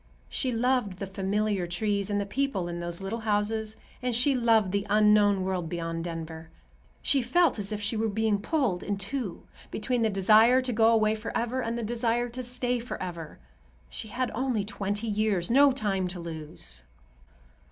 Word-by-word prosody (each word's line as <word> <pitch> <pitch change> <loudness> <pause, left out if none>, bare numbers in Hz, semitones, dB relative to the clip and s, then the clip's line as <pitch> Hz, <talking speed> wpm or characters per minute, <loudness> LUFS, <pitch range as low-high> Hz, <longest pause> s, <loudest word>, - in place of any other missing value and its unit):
She 260 - -1
loved 245 -3 +1
the 195 - -4
familiar 195 0 -1
trees, 200 +3 -1
and 205 0 0
the 200 - -1
people 200 -4 -1
in 175 0 -4
those 170 +1 -2
little 195 +4 -3
houses, 215 0 -1 0.2
and 250 -2 0
she 275 +4 +3
loved 225 -6 +3
the 200 +1 -1
unknown 210 -2 +4
world 185 -3 -2
beyond 165 -1 -3
Denver. 165 -1 -6 0.5
She 275 - +3
felt 255 +3 +2
as 200 +1 +1
if 210 - -2
she 210 +3 0
were 220 0 0
being 215 0 +1
pulled 225 - 0
in 205 -1 -2
two, 200 -1 -4 0.3
between 240 +3 -1
the 225 - +3
desire 215 +5 +5
to 255 -1 -1
go 225 0 +4
away 220 -2 +4
forever 230 +3 -2
and 230 0 -2
the 235 - -3
desire 235 +1 0
to 250 +2 -5
stay 245 0 -1
forever. 175 -9 -6 0.5
She 220 - -7
had 250 +4 -2
only 245 -2 0
twenty 205 +1 -2
years—no 215 +5 +3
time 200 -7 -1
to 180 0 -5
lose. 155 - -7
215 Hz, 175 wpm, -28 LUFS, 195-235 Hz, 0.5 s, desire